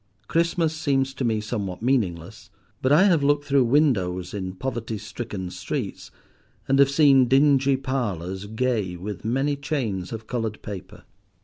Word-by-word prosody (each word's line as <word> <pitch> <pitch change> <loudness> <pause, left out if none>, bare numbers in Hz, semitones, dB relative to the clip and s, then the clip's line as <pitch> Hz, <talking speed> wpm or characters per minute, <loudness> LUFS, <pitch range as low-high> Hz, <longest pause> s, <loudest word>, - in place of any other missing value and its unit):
Christmas 165 -1 +1
seems 135 -4 0
to 135 - -4
me 110 -3 +1
somewhat 105 -3 -4
meaningless; 100 -5 -1 0.3
but 130 - +1
I 155 +6 +6
have 175 -7 +4
looked 145 +1 +2
through 140 -3 +3
windows 100 - +1
in 95 -2 -4
poverty 115 0 -4
stricken 105 -3 -6
streets, 90 -1 -5 0.6
and 135 +1 +3
have 140 -1 +6
seen 140 -3 +5
dingy 135 0 +4
parlours 100 - -3
gay 110 -4 -1
with 100 +4 -6
many 135 +6 0
chains 125 - -3
of 110 -1 -6
coloured 110 -2 -3
paper. 100 0 -8
120 Hz, 145 wpm, -24 LUFS, 100-140 Hz, 0.6 s, I